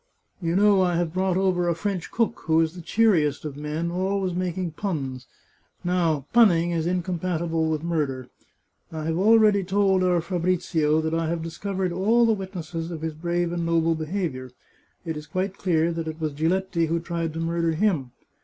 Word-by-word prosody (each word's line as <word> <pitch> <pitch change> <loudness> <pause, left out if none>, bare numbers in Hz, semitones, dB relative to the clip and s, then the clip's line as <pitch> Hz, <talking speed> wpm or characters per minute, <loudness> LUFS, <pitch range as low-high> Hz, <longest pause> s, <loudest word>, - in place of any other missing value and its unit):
" - - -41
You 170 0 0
know 200 0 +5
I 180 -2 +2
have 170 -1 -1
brought 185 0 +1
over 180 -2 +1
a 170 - +1
French 185 0 -3
cook, 230 0 0
who 160 0 +3
is 160 0 +1
the 180 - -9
cheeriest 165 -8 +2
of 145 -2 -5
men, 150 +3 -3
always 190 +1 -1
making 180 -1 -2
puns; 135 -9 -4 0.6
now, 170 -6 +1
punning 175 -8 +5
is 165 -1 -1
incompatible 170 -2 -1
with 155 -1 -2
murder. 145 -7 -2 0.6
I 160 -1 -5
have 165 +1 -1
already 210 -1 +5
told 190 0 +2
our 180 -1 +3
Fabrizio 170 -3 0
that 160 0 -2
I 165 0 0
have 165 0 -2
discovered 185 +2 -3
all 220 +7 +3
the 225 - +4
witnesses 175 -4 -5
of 160 -2 -6
his 160 -1 -2
brave 170 +2 -1
and 170 -1 -2
noble 165 0 +2
behaviour. 155 -5 -3 0.6
It 160 -2 -3
is 150 0 -8
quite 185 +4 -3
clear 165 -4 +2
it 165 -1 -4
was 155 -2 -2
Giletti 170 +2 0
who 165 +1 0
tried 170 -1 -3
to 165 - -5
murder 165 0 0
him. 160 -7 +1
170 Hz, 180 wpm, -25 LUFS, 160-185 Hz, 0.6 s, know